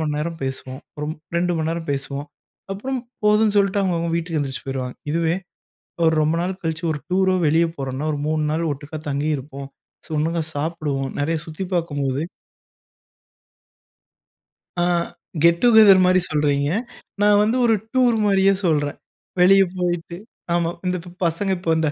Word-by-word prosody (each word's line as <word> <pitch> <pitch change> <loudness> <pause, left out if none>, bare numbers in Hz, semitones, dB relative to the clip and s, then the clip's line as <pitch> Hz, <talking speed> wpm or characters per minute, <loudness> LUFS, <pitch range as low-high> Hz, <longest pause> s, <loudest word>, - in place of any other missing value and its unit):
மணி 150 -2 -1
நேரம் 165 +2 -3
பேசுவோம், 130 0 -5 0.2
ஒரு 150 0 -4 0.3
2 175 +1 +1
மணி 160 0 -1
நேரம் 165 -1 -4
பேசுவோம். 140 +1 -4 0.5
அப்றம் 260 +5 -3 0.2
போதுன்னு 210 0 +4
சொல்லிட்டு 200 0 +3
அவங்கவங்க 170 -3 0
வீட்டுக்கு 165 -2 -2
எந்திரிச்சு 135 -2 -4
போயிருவாங்க. 130 -2 -4 0.2
இதுவே, 165 0 +1 0.7
ஒரு 160 - +4
ரொம்ப 155 +2 +2
நாள் 185 +1 -3
கழிச்சு 160 +1 -3
ஒரு 145 - -5
டூரோ, 190 0 +3
வெளியே 165 +2 +3
போறோம்னா, 135 +2 -3
ஒரு 145 - -4
3 155 -1 0
நாள் 165 +1 0
ஒட்டுக்கா 145 +2 -7
தங்கியிருப்போம், 140 -1 -3 0.5
ஒட்டுக்கா 165 +1 0
சாப்பிடுவோம். 145 -3 -2
நிறைய 160 +2 0
சுத்தி 160 +4 -5
பாக்கும்போது 145 -5 -1 2.6
ஆ - - +3 0.6
கெட்டூகெதெர் 200 +2 +7
மாரி 185 0 +4
சொல்றீங்க. 145 -2 +1 0.5
நா 205 - +4 0.2
வந்து 220 +4 +1
ஒரு 225 - +4 0.2
டூர் 245 -3 +4
மாரியே 195 -1 +4
சொல்றேன். 145 -3 +1 0.4
வெளியே 195 +2 +7
போய்ட்டு, 175 -1 -2 0.4
ஆமா 170 -1 +1 0.2
இந்த 180 0 0 0.3
பசங்க 170 +4 0
இப்ப 170 -2 0
இந்த, 160 -1 +1
165 Hz, 140 wpm, -22 LUFS, 145-185 Hz, 2.6 s, கெட்டூகெதெர்